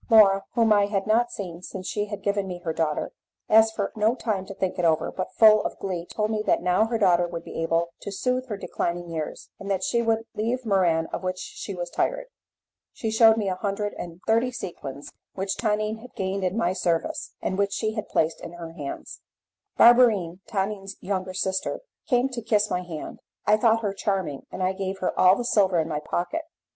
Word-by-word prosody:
Laura, 200 -4 +7
whom 225 -2 +5
I 205 -1 +4
had 195 -2 -1
not 230 +3 +3
seen 175 -4 -6
since 185 0 -7
she 205 -1 -1
had 205 -1 -7
given 200 -1 0
me 180 -1 -5
her 160 - -1
daughter, 160 -2 -1 0.4
asked 220 0 +5
for 200 -2 -1
no 220 +2 +2
time 210 -6 -2
to 195 - -8
think 190 -1 -2
it - - 0
over, 160 -2 +2
but 185 - -4
full 215 -1 +7
of - - -4
glee 180 -3 -4
told 215 0 -1
me 215 -1 0
that - - +2
now 180 +4 +3
her 230 0 0
daughter 175 -4 +4
would 170 -1 -6
be - - -6
able 165 +1 0
to 200 - -6
soothe 255 +5 -1
her 210 -4 -4
declining 175 -3 -3
years, 160 -2 -5
and 200 - -7
that 190 -1 0
she 235 - +1
would 225 -1 +1
leave 235 +4 -2
Muran 175 -6 +2
of - - -2
which 185 0 -2
she 195 +1 -7
was 175 -1 -5
tired. - - -1 0.7
She 220 - -3
shewed 225 0 +6
me 210 -3 -1
a 190 - +1
hundred 205 +1 -2
and 175 0 -8
thirty 230 +3 +3
sequins 140 - -7 0.2
which 190 0 -2
Tonine 215 0 -1
had 250 +3 -14
gained 190 0 -2
in 185 +3 0
my 185 -5 +1
service, 170 -3 -1
and 185 - -2
which 200 0 +1
she 215 0 -1
had 215 -1 -5
placed 160 +1 0
in 170 - -8
her 170 -1 -8
hands. 145 -5 -7 0.6
Barberine, 220 -8 +6
Tonine's 195 -1 -3
younger 185 -1 -3
sister, 190 0 -1 0.3
came 245 0 +3
to 250 -3 -5
kiss 210 -2 +1
my 180 - 0
hand. 170 -4 -7 0.3
I 210 - +5
thought 225 0 +3
her 200 -2 0
charming, 190 -8 -2
and 185 - -4
I 185 +1 +1
gave 190 0 -3
her 185 - -1
all 185 +1 +7
the 245 - -3
silver 195 -6 +3
in 160 - 0
my 150 -2 -2
pocket. 175 - -2
195 Hz, 215 wpm, -25 LUFS, 180-220 Hz, 0.7 s, Laura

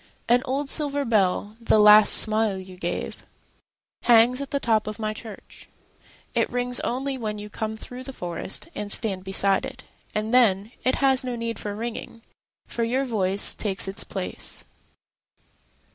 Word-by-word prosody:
An 245 +1 +4
old 275 +2 -2
silver 285 -1 -1
bell, 205 -1 +1
the 230 - +3
last 210 0 +8
smile 215 -2 +4
you 185 0 -10
gave, 175 -1 -4 0.8
Hangs 240 +2 +5
at 280 - -5
the 280 - -1
top 220 -5 +1
of 215 - -5
my 215 -1 -2
church.It 215 -1 -7
rings 245 0 0
only 265 +2 -2
when 215 -2 -3
you 210 0 -8
come 220 +1 -4
through 250 +3 -9
the 270 - -6
forestAnd 205 - -3
stand 195 -5 0
beside 195 0 +1
it. - - -8 0.3
And 215 +2 -2
then, 215 -4 +3
it 255 - +2
has 265 -1 +3
no 250 -1 -3
need 230 -2 -4
for 205 -1 -5
ringing, 230 0 -6 0.4
For 235 - -3
your 255 +4 0
voice 200 -5 -1
takes 195 -2 -3
its 195 - 0
place. - - -5
220 Hz, 155 wpm, -24 LUFS, 205-250 Hz, 0.8 s, last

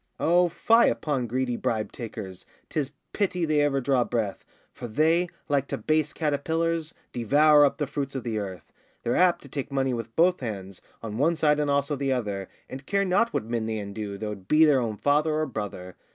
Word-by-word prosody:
O 175 +2 +3
fie 230 +7 +4
upon 135 -5 -1
greedy 125 +1 -1
bribe 110 -2 -2
takers, 100 -6 -7 0.3
'Tis 145 -3 -1 0.2
pity 180 -4 0
they 155 -2 +2
ever 145 -2 +2
drew 130 -1 +2
breath, 110 -5 -2 0.3
For 120 - -7
they, 160 +8 +2 0.2
like 140 -2 +1
to - - -3
base 155 -1 +1
caterpillars, 160 +2 -1 0.2
Devour 145 +5 +5
up 140 - 0
the 150 - -1
fruits 140 -1 -4
of 130 - -3
the 110 -3 -2
earth. 95 -3 -7 0.3
They're 120 - 0
apt 180 -1 +3
to - - -12
take 140 +1 -5
money 135 -1 0
with 115 -1 -5
both 180 +2 +3
hands, 100 -6 -6 0.2
On 110 0 -5
one 165 +4 +3
side 150 -2 +2
and 145 -1 0
also 140 +1 +1
the 135 0 -1
other, 100 -6 -3 0.2
And 135 +1 -9
care 200 0 +1
not 200 +5 +2
what - - -2
men 115 -1 -2
they 110 -1 -2
undo, 100 0 -5
Though 105 +1 -4
it 95 -3 -9
be 155 +6 +6
their 145 -3 +4
own 110 -3 -3
father 150 +4 +2
or 155 0 +1
brother. 100 - -6
140 Hz, 205 wpm, -26 LUFS, 110-155 Hz, 0.3 s, be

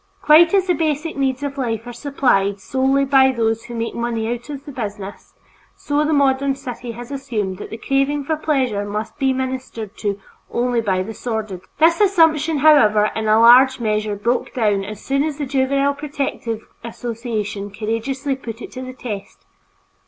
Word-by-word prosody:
Quite 325 +3 +7
as 385 -2 +3
the 360 - +2
basic 310 0 -1
needs 270 -1 -1
of 280 -1 -4
life 230 -3 -2
are 245 - -7
supplied 235 -7 +1
solely 265 +4 +1
by 265 -1 +5
those 225 -2 -1
who 240 - -8
make 230 0 -3
money 235 -1 -2
out 240 +2 -9
of 280 -1 -7
the 290 - -8
business, 205 -5 -7 0.4
so 290 +1 -1
the 305 - 0
modern 275 -1 +2
city 245 -2 -7
has 240 +3 -9
assumed 210 -9 -3
that - - -7
the 225 - -6
craving 275 +4 0
for 315 +3 -1
pleasure 265 -9 0
must 210 +2 -5
be 270 -1 +2
ministered 260 -5 -4
to 205 -2 -2 0.3
only 240 -1 0
by 190 -4 0
the 220 +4 -7
sordid. 220 -6 -4 0.2
This 335 +4 +4
assumption, 325 -6 +3
however, 215 -9 +5
in 220 0 -2
a 215 +1 +5
large 255 +3 +7
measure 215 -2 -1
broke 235 +5 -1
down 210 -5 +1
as 210 +1 -8
soon 275 +1 +1
as 305 -2 -3
the 295 - -3
Juvenile 275 +1 +1
Protective 280 -6 -4 0.2
Association 225 -3 -4
courageously 245 +7 -3
put 230 -4 -8
it - - -9
to 255 - -7
the 255 0 -7
test. 195 - -8
250 Hz, 180 wpm, -20 LUFS, 220-275 Hz, 0.4 s, Quite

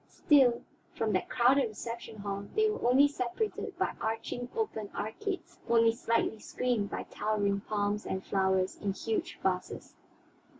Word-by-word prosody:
Still, 260 -5 +4 0.3
from 220 -2 0
that 185 - 0
crowded 255 +2 +4
reception 230 +1 -7
hall 200 0 -4
they 435 0 +4
were 425 - 0
only 275 +3 +7
separated 285 - -3
by - - 0
arching, 225 +2 -3
open 220 - -2
arcades; 380 - -4
only 230 -1 +5
slightly 230 -2 0
screened 235 -5 -1
by - - -4
towering 205 -2 0
palms 205 0 0
and 190 0 -3
flowers 190 -1 +1
in 200 -2 -2
huge 220 +2 -2
vases. 185 -1 -2
225 Hz, 140 wpm, -31 LUFS, 205-245 Hz, 0.3 s, only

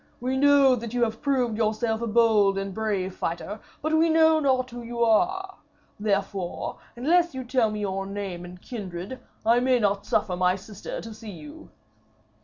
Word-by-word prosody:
We 255 +2 -1
know 280 -1 +5
that 235 0 -6
you 240 - +2
have 225 -1 -2
proved 255 -6 +1
yourself 220 +1 0
a 235 - -2
bold 215 -3 +4
and 195 0 -3
brave 200 -3 -2
fighter, 195 +5 -4 0.2
but 310 +1 0
we 325 +1 +4
know 320 0 +5
not 260 -3 +1
who 240 0 -7
you 235 0 -2
are. 375 - +1 0.4
Therefore, 200 -3 -2 0.2
unless 335 +6 +2
you 260 - -4
tell 245 -2 +2
me 210 0 -4
your 195 -1 -2
name 195 -3 -5
and 180 0 -10
kindred, 195 +2 -7 0.3
I 230 +2 +5
may 255 0 +3
not 205 -3 0
suffer 185 -4 +1
my 180 0 +2
sister 195 +1 -7
to 225 - -8
see 220 0 -10
you.' 155 -6 -11
225 Hz, 180 wpm, -26 LUFS, 195-255 Hz, 0.4 s, know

